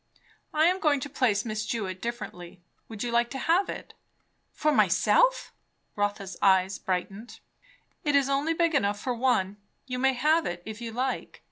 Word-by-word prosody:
I 310 +1 +3
am 365 +2 +3
going 295 -4 +2
to 285 0 -6
place 235 -6 +1
Miss 215 -1 -3
Jewett 195 -5 -4
differently. 190 -7 -6 0.3
Would 220 -1 -5
you 240 - -2
like 235 0 +2
to 270 - -5
have 335 +8 +2
it?" - - -7 0.6
"For 305 - +1
myself?" - - +3 0.4
Rotha's 205 -2 -2
eyes 190 0 +3
brightened. 195 +5 -4 0.6
"It 295 -3 +1
is 280 -1 +4
only 280 +4 0
big 335 -1 +2
enough 205 -7 +1
for 250 +3 -2
one. 230 -5 +1 0.3
You 250 -1 -4
may 265 +1 +3
have 305 +6 +2
it, 175 0 -5
if 220 +1 -8
you 230 -1 -5
like. 255 +3 -3
240 Hz, 170 wpm, -27 LUFS, 205-285 Hz, 0.6 s, is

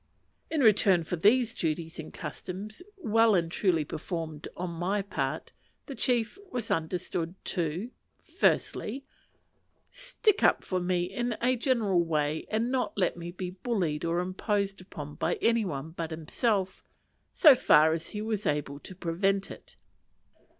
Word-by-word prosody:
In 315 -3 0
return 200 -6 +5
for 170 - -3
these 225 +6 +3
duties 165 +1 -2
and 160 - -7
customs, 200 - -7 0.2
well 225 - +4
and 170 -2 +1
truly 170 -5 +1
performed 160 -1 -5
on 180 0 -3
my 185 +4 -1
part, 200 - -3 0.3
the 280 - -7
chief 245 - 0
was 245 - -4
understood 170 +1 -2
to 175 +6 -2 0.3
Firstly. 270 +6 0 0.9
Stick 480 -4 0
up - - +4
for 185 - -1
me 180 0 0
in 230 +6 -2
a 255 +2 +2
general 225 -8 +2
way, 155 -1 -1
and 225 +3 0
not 260 -5 -1
let 185 -3 +1
me 170 0 -7
be 180 0 -5
bullied 180 -6 -2
or 170 +1 +1
imposed 195 +1 -1
upon 150 -5 -8
by - - -1
any 230 -1 +2
one 155 -2 -4
but 165 -1 -4
himself, 190 +5 -1 0.5
so 305 -6 +8
far 160 -10 +5
as 165 0 -4
he 210 0 -5
was 215 -2 -2
able 145 -1 -1
to 185 - -10
prevent 195 +3 0
it. - - -12
185 Hz, 150 wpm, -29 LUFS, 165-225 Hz, 0.9 s, so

